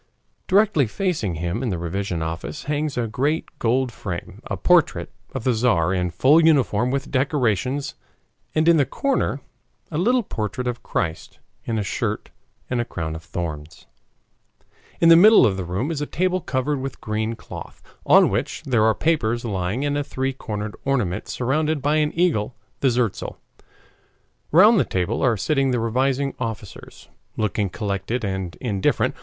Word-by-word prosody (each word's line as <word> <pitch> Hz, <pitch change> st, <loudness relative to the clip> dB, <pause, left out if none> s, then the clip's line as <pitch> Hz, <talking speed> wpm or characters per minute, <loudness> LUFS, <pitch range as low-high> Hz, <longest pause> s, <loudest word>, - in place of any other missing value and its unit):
Directly 195 Hz, -, +3 dB
facing 140 Hz, -, -1 dB
him 85 Hz, +7 st, -2 dB
in 130 Hz, -, -1 dB
the 90 Hz, -, -1 dB
revision 85 Hz, 0 st, -3 dB
office 80 Hz, -, -5 dB
hangs 150 Hz, -1 st, -2 dB
in 120 Hz, -, +1 dB
a -, -, -2 dB
great 145 Hz, +7 st, -2 dB
gold 125 Hz, +2 st, +1 dB
frame 90 Hz, -6 st, -7 dB
a -, -, -3 dB
portrait -, -, +2 dB, 0.2 s
of 130 Hz, -, -5 dB
the 130 Hz, -, +2 dB
Tzar 110 Hz, -7 st, +2 dB
in 90 Hz, -1 st, 0 dB
full 135 Hz, -, +4 dB
uniform 130 Hz, -7 st, +3 dB
with 140 Hz, +1 st, -2 dB
decorations, 135 Hz, -, 0 dB, 0.6 s
and 155 Hz, +1 st, +2 dB
in 170 Hz, -1 st, +6 dB
the 140 Hz, -, +3 dB
corner 275 Hz, -1 st, -1 dB, 0.5 s
a 155 Hz, -, -1 dB
little 245 Hz, +6 st, +3 dB
portrait 115 Hz, -, -4 dB
of 120 Hz, -1 st, -3 dB
Christ 80 Hz, -4 st, -3 dB, 0.3 s
in 115 Hz, -2 st, -1 dB
a 105 Hz, -, 0 dB
shirt -, -, -3 dB, 0.4 s
and 125 Hz, -1 st, 0 dB
a -, -, 0 dB
crown 80 Hz, -8 st, -5 dB
of 80 Hz, -, -7 dB
thorns. 80 Hz, -3 st, -6 dB, 1.1 s
In 165 Hz, -, +5 dB
the 165 Hz, -, +9 dB
middle 215 Hz, +6 st, +8 dB
of 100 Hz, -, +2 dB
the 95 Hz, -, -3 dB
room 95 Hz, -, -2 dB
is 150 Hz, -3 st, -3 dB
a 145 Hz, -, -2 dB
table 185 Hz, +1 st, 0 dB
covered 135 Hz, 0 st, -1 dB
with 135 Hz, 0 st, -5 dB
green 110 Hz, +1 st, -2 dB
cloth, -, -, -10 dB, 0.2 s
on -, -, +5 dB
which -, -, -2 dB
there 120 Hz, -5 st, +2 dB
are 110 Hz, -1 st, +3 dB
papers 120 Hz, -8 st, 0 dB
lying 100 Hz, +5 st, -2 dB
and 145 Hz, 0 st, 0 dB
a 145 Hz, -, 0 dB
three 135 Hz, -1 st, -2 dB
cornered 105 Hz, -5 st, -5 dB
ornament 120 Hz, -10 st, -1 dB
surmounted 150 Hz, +5 st, 0 dB
by 145 Hz, +3 st, +1 dB
an 150 Hz, -1 st, +1 dB
eagle 150 Hz, -10 st, +1 dB, 0.2 s
the 135 Hz, -, +3 dB
zertzal. 120 Hz, -4 st, -1 dB, 1.1 s
Round 205 Hz, +7 st, +7 dB
the -, -, +4 dB
table 95 Hz, +5 st, -2 dB
are 120 Hz, -4 st, +2 dB
sitting 135 Hz, +5 st, +1 dB
the 125 Hz, -2 st, +1 dB
revising 130 Hz, +4 st, 0 dB
officers, 110 Hz, -5 st, -7 dB, 0.3 s
looking 105 Hz, -1 st, 0 dB
collected 105 Hz, +4 st, -3 dB
and 95 Hz, -3 st, -3 dB
indifferent. 100 Hz, -7 st, 0 dB
125 Hz, 170 wpm, -22 LUFS, 100-145 Hz, 1.1 s, the